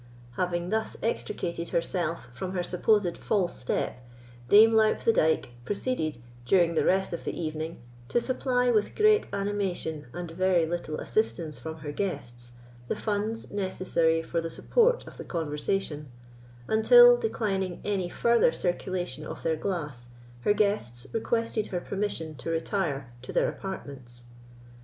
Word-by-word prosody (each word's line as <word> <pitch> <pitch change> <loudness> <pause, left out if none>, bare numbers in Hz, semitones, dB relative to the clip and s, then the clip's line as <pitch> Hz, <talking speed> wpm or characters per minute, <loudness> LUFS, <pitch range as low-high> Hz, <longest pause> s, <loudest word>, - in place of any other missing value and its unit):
Having 175 +5 -1
thus 220 0 -1
extricated 170 -6 -2
herself 170 -3 -1
from 180 +10 -5
her 180 -1 -1
supposed 180 0 +1
false 190 -5 0
step, 125 0 -2 0.5
Dame 220 +2 +8
Loup 220 -1 +4
the 230 - +3
Dyke 160 - +2
proceeded, 200 - -2 0.3
during 170 +6 +3
the 160 - +2
rest 190 -1 +2
of 170 - -4
the - - -4
evening, 160 0 -4 0.3
to - - +2
supply, 250 0 +1
with 215 -3 +1
great 430 0 +4
animation, 195 -7 -2
and 175 +3 -6
very 180 -1 +2
little 165 -2 -3
assistance 170 -8 -1
from 160 0 -6
her 145 - -3
guests, 120 -9 -5 0.3
the - - -1
funds 215 +1 -2
necessary 185 -4 +1
for 165 +1 -1
the 165 - -4
support 480 - +2
of - - -11
the - - -6
conversation, 150 -1 -2 0.6
until, 485 - +8
declining 195 - -2
any 195 -4 -1
further 235 -5 +3
circulation 175 -4 -2
of - - -8
their 160 - +1
glass, 150 -9 -4 0.3
her 205 - +3
guests 200 - 0
requested 230 -1 0
her 180 - -2
permission 190 -5 -3
to 140 +3 -7
retire 160 - -2
to 130 - -8
their - - +2
apartments. 130 -10 -7
180 Hz, 145 wpm, -28 LUFS, 160-210 Hz, 0.6 s, Dame